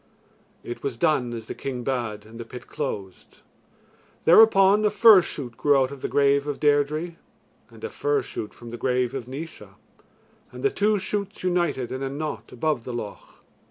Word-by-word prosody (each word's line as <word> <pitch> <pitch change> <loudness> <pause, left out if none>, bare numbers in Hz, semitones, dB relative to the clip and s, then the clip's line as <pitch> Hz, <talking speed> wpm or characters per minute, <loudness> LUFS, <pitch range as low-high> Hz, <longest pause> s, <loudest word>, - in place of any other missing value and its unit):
It 120 - -7
was 130 -4 -3
done 130 -4 +1
as 115 -2 -6
the - - -6
king 125 -3 -5
bade, 120 -5 -3
and 115 +2 -12
the - - -4
pit 125 +2 -10
closed. 100 -11 -6 0.8
Thereupon 200 +1 +6
a 210 - +4
fir 215 -3 +7
shoot 130 -7 -7
grew 145 -1 +4
out 130 0 +1
of 140 -2 -9
the - - -2
grave 140 0 +2
of 145 - -3
Deirdre 150 +3 +1 0.5
and - - -16
a 455 - -3
fir 440 -3 0
shoot 105 - -6
from 120 -1 -12
the 120 - -6
grave 125 -1 +1
of 130 -3 -5
Naois, 150 +6 -8 0.8
and - - -10
the 415 - +3
two 210 - +2
shoots 200 +1 -4
united 175 -8 0
in 130 - -4
a 135 - -2
knot 150 +3 -5
above 135 -1 -1
the 125 - -6
loch. 105 -4 -8
140 Hz, 185 wpm, -25 LUFS, 120-175 Hz, 0.8 s, fir